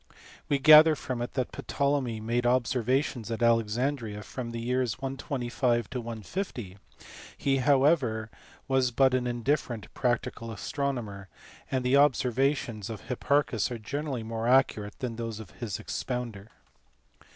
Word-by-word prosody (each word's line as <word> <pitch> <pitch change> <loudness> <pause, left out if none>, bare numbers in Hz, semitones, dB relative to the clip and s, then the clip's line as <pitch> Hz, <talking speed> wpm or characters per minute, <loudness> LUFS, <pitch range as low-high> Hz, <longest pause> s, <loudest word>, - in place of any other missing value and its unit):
We 140 - +3
gather 155 +2 +8
from 130 -4 -4
it 120 - -4
that 130 -3 -1
Ptolemy 140 -5 -1
made 120 +2 0
observations 125 0 +1
at 115 +1 -2
Alexandria 115 -1 +1
from 125 +1 -6
the 115 0 -5
years 125 -1 -1
125 125 -3 -1
to 125 - -3
150; 115 - -5 0.6
he 135 -1 +1
however 130 -5 +2 0.4
was 130 -2 +2
but 130 +2 +3
an 125 -1 +1
indifferent 120 -2 -2
practical 120 -1 -1
astronomer, 115 -5 -3 0.4
and 130 -1 -1
the 130 +2 +4
observations 135 -5 +1
of 110 -4 -6
Hipparchus 135 -2 +1
are 120 - -4
generally 135 +2 -4
more 115 +1 -3
accurate 120 -5 +2
than 120 -3 -4
those 115 -2 -4
of 110 - -10
his 110 -5 -5
expounder. 120 -5 -5
125 Hz, 130 wpm, -28 LUFS, 115-135 Hz, 0.6 s, gather